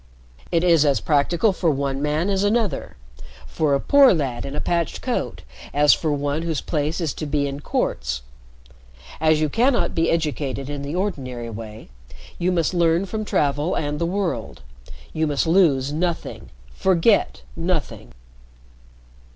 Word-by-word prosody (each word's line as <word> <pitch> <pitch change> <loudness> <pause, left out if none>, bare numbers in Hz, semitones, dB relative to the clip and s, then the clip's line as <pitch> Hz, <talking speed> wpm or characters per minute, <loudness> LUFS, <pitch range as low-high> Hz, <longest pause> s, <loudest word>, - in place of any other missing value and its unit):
It 170 0 +2
is 170 -4 +5
as 140 -2 +2
practical 165 +7 +2
for 180 -2 0
one 140 -1 -1
man 155 +6 0
as 195 0 +1
another 215 0 -1 0.5
for 140 - 0
a - - +1
poor 275 - +6
lad 135 -6 -3
in 140 - -6
a - - -2
patched 170 0 -1
coat - - -3 0.3
as 145 0 +6
for 155 - -1
one 145 +1 -1
whose 165 -3 -2
place 155 +1 -2
is 160 -6 -1
to 155 - -5
be 145 0 0
in 140 0 -5
courts. 60 - -2 1.0
As 155 0 +3
you 155 - +2
cannot 240 - +1
be 165 0 +1
educated 145 -4 -2
in 145 -1 -5
the 140 +3 -5
ordinary 130 - -3
way, 110 -3 -9 0.5
you 180 +1 +1
must 170 -1 0
learn 170 +1 +2
from 215 +2 -4
travel 145 -2 0
and 150 0 -2
the 170 - 0
world. 170 - -3 0.5
You 160 0 0
must 145 +1 0
lose 150 -6 +3
nothing 170 +2 -3 0.2
forget 190 - +2
nothing." 165 - -3
155 Hz, 155 wpm, -22 LUFS, 140-175 Hz, 1.0 s, poor